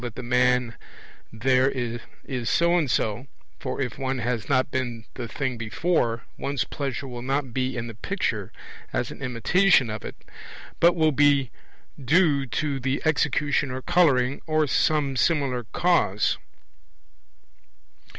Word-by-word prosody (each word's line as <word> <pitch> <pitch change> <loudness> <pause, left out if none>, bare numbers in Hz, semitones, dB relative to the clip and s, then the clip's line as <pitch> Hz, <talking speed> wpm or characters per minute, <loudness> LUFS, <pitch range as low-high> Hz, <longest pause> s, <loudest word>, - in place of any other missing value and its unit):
that 120 -3 -6
the 125 - -6
man 125 0 +2 0.6
there 130 +3 +2
is 120 0 -5
so 170 +1 +3
and 160 -6 +1
so; 115 +3 -1 0.3
for 130 0 -4
if 130 -2 -3
one 135 0 -1
has 120 -1 -2
not 130 -2 +3
seen 120 -4 -3
the 120 -2 -6
thing 130 0 -3
before, 115 0 0 0.2
one's 140 -2 -1
pleasure 140 0 -4
will 120 -2 -7
not 135 0 -2
be 130 0 -1
in 120 - -3
the 115 - -7
picture 110 - -3 0.4
as - - -2
an - - -11
imitation 130 - +3
of 105 -1 -6
it, - - -7 0.6
but 170 +1 +5
will 160 -2 +3
be 140 -3 +3 0.5
due 145 -1 +3
to 140 +3 -2
the 135 +2 -1
execution 145 -2 +1
or 130 0 -5
colouring 140 -7 +3
or 155 -1 +2
some 145 -1 +1
similar 130 -5 +1
cause. 120 - +1
130 Hz, 140 wpm, -25 LUFS, 120-145 Hz, 0.6 s, but